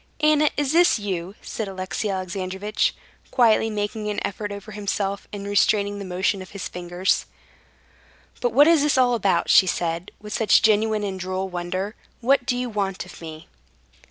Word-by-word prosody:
"Anna, 305 -1 +4
is 290 -2 +1
this 345 -3 +5
you?" 190 -2 -4
said 220 - -4
Alexey 190 +2 -3
Alexandrovitch, 190 +2 -2 0.3
quietly 225 -3 +3
making 210 0 -3
an 210 - -2
effort 205 +1 -4
over 200 +1 -8
himself, 200 -1 -3
and 200 -1 -6
restraining 205 0 +2
the 200 - -6
motion 185 +2 -1
of 185 - -10
his 200 -1 -6
fingers. 180 +1 -1 1.1
"But 245 - +1
what 285 +6 +6
is 330 -3 +5
it 295 -2 +2
all 250 -1 +4
about?" 200 -5 +1
she 190 - +7
said, 170 0 -2
with 210 0 -8
such 225 -3 +4
genuine 215 0 +3
and 190 -2 -3
droll 185 +1 -3
wonder. 185 +3 -3 0.3
"What 260 +1 +2
do 245 -2 +1
you 250 0 -2
want 195 -5 -2
of 180 - -13
me?" 160 -1 -9
205 Hz, 170 wpm, -23 LUFS, 185-225 Hz, 1.1 s, she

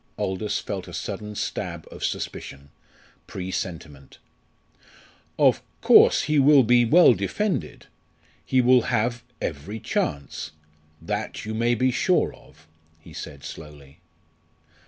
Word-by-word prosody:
Aldous 95 +3 -2
felt - - -5
a - - -8
sudden 105 0 -6
stab - - -4
of - - -9
suspicion 70 +1 -5 0.6
presentiment. 85 -6 -6 1.2
"Of - - +4 0.2
course - - +6
he 150 -1 +1
will 140 0 +6
be 120 +1 +4
well 160 +2 +6
defended; 135 - -3 0.6
he 130 - +2
will 125 0 +5
have 120 0 0 0.2
every 85 +8 -5
chance; 75 -3 -3 0.5
that 105 +6 -4
you 110 - -4
may 120 +2 +1
be 130 +3 +1
sure 180 +8 +1
of," 75 +5 -20 0.3
he 80 - -15
said 70 -2 -9
slowly. 75 -3 -11
105 Hz, 115 wpm, -24 LUFS, 75-125 Hz, 1.2 s, course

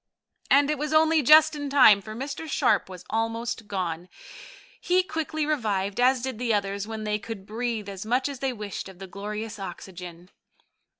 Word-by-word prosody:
And 285 +1 +5
it 300 - -2
was 300 +1 -2
only 315 0 +4
just 310 +3 +7
in 290 -1 -4
time, 250 -8 +7
for 215 +2 -8
Mr. 280 +5 -5
Sharp 205 -8 +2
was 185 -2 -10
almost 225 0 -2
gone. 180 -3 -3 0.7
He 365 +1 +2
quickly 315 -3 -3
revived, 205 -9 -1
as 250 0 +3
did 260 -4 -4
the 235 -3 +1
others, 200 0 -2
when 220 -1 -5
they 210 0 -1
could 200 -2 -8
breathe 225 -1 -3
as 195 -1 -6
much 250 +5 +1
as 280 -3 -6
they 270 0 -1
wished 210 -4 -6
of 190 - -13
the 195 - -8
glorious 210 +3 -6
oxygen. 180 -1 -9
225 Hz, 180 wpm, -26 LUFS, 200-280 Hz, 0.7 s, just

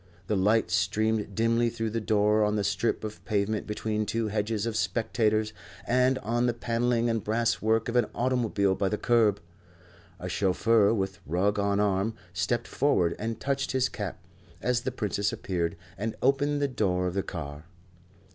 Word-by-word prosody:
The 105 - 0
light 105 +1 +2
streamed 105 +3 0
dimly 115 +1 +2
through 115 -1 -3
the 115 +1 -2
door 105 0 +3
on 105 0 +1
the 105 - 0
strip 100 +4 0
of 105 -4 -7
pavement 105 0 -1
between 105 0 -2
two 115 -1 -1
hedges 105 0 -1
of 115 -2 -2
spectators, 110 +1 0 0.3
and 125 +2 +3
on 120 +2 +1
the 120 - 0
panelling 120 0 0
and 115 -2 0
brass 115 +2 0
work 110 +1 +2
of 120 - -3
an 120 -3 +3
automobile 115 -6 +1
by 95 0 0
the 105 - -1
curb. 110 -4 +3 0.8
A - - -5
chauffeur, 100 +2 +3
with 95 -4 -2
rug 100 +6 +1
on 100 0 +1
arm, 105 +2 +1 0.2
stepped 90 +7 -1
forward 90 -12 +1
and 115 +1 -3
touched 140 0 -1
his 130 -1 +2
cap, 100 -5 -5 0.4
as 125 +2 0
the 130 - -2
Princess 105 -4 -1
appeared, 85 -3 -2 0.2
and 110 +1 -2
opened 145 +2 +2
the - - +3
door 95 -8 0
of 90 - -1
the 100 - 0
car. 75 -4 -7
110 Hz, 175 wpm, -28 LUFS, 100-115 Hz, 0.8 s, door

